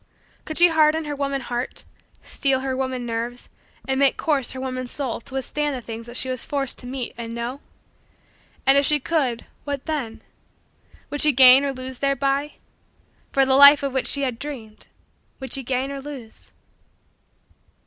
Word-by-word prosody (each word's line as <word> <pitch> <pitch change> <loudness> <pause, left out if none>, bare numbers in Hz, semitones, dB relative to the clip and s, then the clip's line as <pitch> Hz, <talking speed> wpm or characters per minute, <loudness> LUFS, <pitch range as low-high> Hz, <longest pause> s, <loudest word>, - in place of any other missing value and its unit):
Could 310 - -4
she 350 0 +7
harden 315 0 +3
her 295 -1 -4
woman 275 -1 -2
heart, 245 0 -5 0.4
steel 270 -2 0
her 265 -1 -2
woman 260 -2 -3
nerves, 235 +1 -5 0.4
and 265 0 0
make 275 -1 +3
coarse 285 -5 0
her 260 - -7
woman 255 -1 -4
soul 255 -2 -4
to 260 - -12
withstand 290 +2 -2
the - - -4
things 230 0 -8
that 240 +1 -5
she - - +1
was 255 -1 -3
forced 275 -3 -2
to 245 - -8
meet 255 -1 -5
and 230 -1 -6
know? 235 +3 -5 1.1
And 270 +1 +6
if 280 - +1
she 300 0 +3
could 265 -6 -1 0.2
what 285 -2 -5
then 280 -8 -4 0.9
would 290 - -1
she 305 - +6
gain 260 +1 +8
or 280 - -1
lose 255 -1 -7
thereby? 275 +1 0 0.8
For 270 -1 +3
the 265 - +2
life 280 +1 +8
of 275 -2 -2
which 265 - -1
she 280 - +1
had 250 -3 -2
dreamed, 235 -8 -9 0.5
would 265 -1 -6
she 270 - 0
gain 265 +1 -2
or 275 -1 -6
lose? 265 -6 -10
265 Hz, 180 wpm, -22 LUFS, 250-280 Hz, 1.1 s, gain